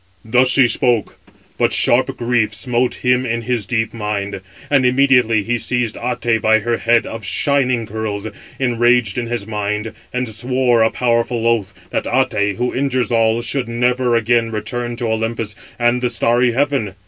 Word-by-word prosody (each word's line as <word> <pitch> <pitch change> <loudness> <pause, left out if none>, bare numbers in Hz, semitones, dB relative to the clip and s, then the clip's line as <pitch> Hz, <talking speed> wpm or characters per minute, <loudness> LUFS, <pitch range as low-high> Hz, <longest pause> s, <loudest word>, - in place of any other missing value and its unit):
"Thus 125 +3 +3
she 130 -1 +5
spoke; 120 -3 +1 0.4
but - - +2
sharp - - +2
grief 115 -3 0
smote 120 +3 -2
him 125 0 +3
in 115 -2 -2
his 120 -3 -2
deep 115 -3 -1
mind; 105 -3 -4 0.3
and 140 -2 +2
immediately 125 -4 +3
he 120 +3 -1
seized 120 -3 -1
Até 120 -2 -1
by 110 0 +4
her 115 +2 -1
head 115 0 +2
of 115 -1 -7
shining 125 +4 0
curls, 105 -1 -4 0.3
enraged 120 -3 +2
in 120 - -4
his 115 -3 -3
mind, 105 0 -3 0.2
and 125 0 -2
swore 120 +2 +1
a 110 - +4
powerful 115 -1 0
oath, 115 -4 0 0.2
that - - -2
Até, 110 -6 0
who 125 +1 -2
injures 130 -4 -1
all, 115 0 +2
should 130 -3 -1
never 125 +1 +1
again 115 0 +2
return 120 +2 -4
to 120 0 -4
Olympus 110 -1 -2 0.2
and 120 +1 +1
the 125 - 0
starry 120 +1 +1
heaven. 135 -7 -1
120 Hz, 165 wpm, -18 LUFS, 110-125 Hz, 0.4 s, she